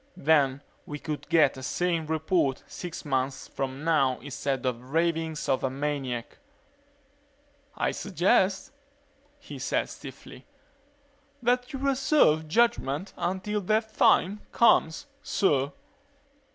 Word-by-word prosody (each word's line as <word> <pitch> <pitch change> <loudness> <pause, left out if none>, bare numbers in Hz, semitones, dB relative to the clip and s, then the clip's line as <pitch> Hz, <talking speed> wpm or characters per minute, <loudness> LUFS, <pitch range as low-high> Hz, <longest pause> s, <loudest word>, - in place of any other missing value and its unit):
Then 140 -2 +2 0.2
we 150 - -5
could 150 0 -6
get 155 -6 +4
a - - -8
sane 165 +3 -1
report 160 -3 0
six 175 -3 -8
months 130 -1 -1
from 135 +1 -5
now 140 -6 +2
instead 140 0 -3
of 125 -2 -1
the 125 - -16
ravings 165 +1 -1
of 130 - +1
a 130 - +1
maniac." 135 -3 -4 1.4
"I - - +1
suggest," 190 0 +1 0.7
he 290 - -10
said - - -1
stiffly, - - -11 1.0
"that 250 +3 +1
you 275 - -4
reserve 270 - +3
judgement 190 - +1
until 190 +4 -2
that 220 +3 0
time 205 +3 +3
comes, 235 - +3 0.2
sir." 145 -8 +1
160 Hz, 115 wpm, -27 LUFS, 135-190 Hz, 1.4 s, get